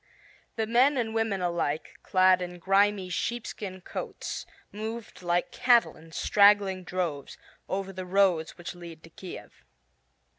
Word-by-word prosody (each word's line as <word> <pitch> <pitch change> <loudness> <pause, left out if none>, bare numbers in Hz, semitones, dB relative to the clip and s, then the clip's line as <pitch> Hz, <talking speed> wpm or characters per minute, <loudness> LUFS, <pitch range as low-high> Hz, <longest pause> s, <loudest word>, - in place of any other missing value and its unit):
The 220 - 0
men 250 +5 +4
and 225 -3 -1
women 220 -4 0
alike, 170 -3 -2
clad 185 -1 +4
in 180 0 -5
grimy 195 +2 +2
sheepskin 200 -2 -4
coats, - - -6 0.2
moved 220 0 -6
like 175 0 0
cattle 240 -2 +3
in 160 +1 -16
straggling 200 0 +4
droves, 170 -6 -3 0.3
over 195 0 -3
the 185 0 -6
roads 180 -4 +2
which 175 - -7
lead 170 -2 -11
to 165 - -14
Kiev. 185 +2 -10
190 Hz, 135 wpm, -28 LUFS, 175-210 Hz, 0.3 s, men